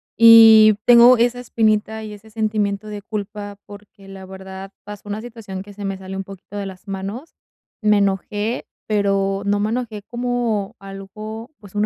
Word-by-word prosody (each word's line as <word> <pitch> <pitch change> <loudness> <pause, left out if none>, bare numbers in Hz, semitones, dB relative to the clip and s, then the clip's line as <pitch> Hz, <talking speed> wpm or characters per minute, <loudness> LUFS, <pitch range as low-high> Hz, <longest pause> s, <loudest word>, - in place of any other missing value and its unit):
Y 225 -2 +8
tengo 245 +1 +8
esa 240 +1 +1
espinita 220 -2 0
y 215 -1 -8
ese 210 +2 -14
sentimiento 215 -2 -2
de 210 -1 -7
culpa 205 -1 -6
porque, 205 -1 -15
la 190 -1 -11
verdad, 190 0 -10
pasó 205 0 -10
una 205 +1 -4
situación 220 -5 -8
que 205 - -13
se 205 0 -7
me 195 -1 -3
salió 190 0 -8
un - - -3
poquito 195 +1 -13
de 200 -1 -4
las 190 +1 -12
manos. 200 +10 -6 0.5
Me 210 -1 +3
enojé, 205 +3 -2 0.2
pero 195 -2 0
no 205 0 0
me 210 +1 0
enojé 225 -4 -4
como 240 -4 -2
algo, 215 +4 -9
pues 200 -3 -15
un 210 0 +1
210 Hz, 170 wpm, -20 LUFS, 195-220 Hz, 0.5 s, Y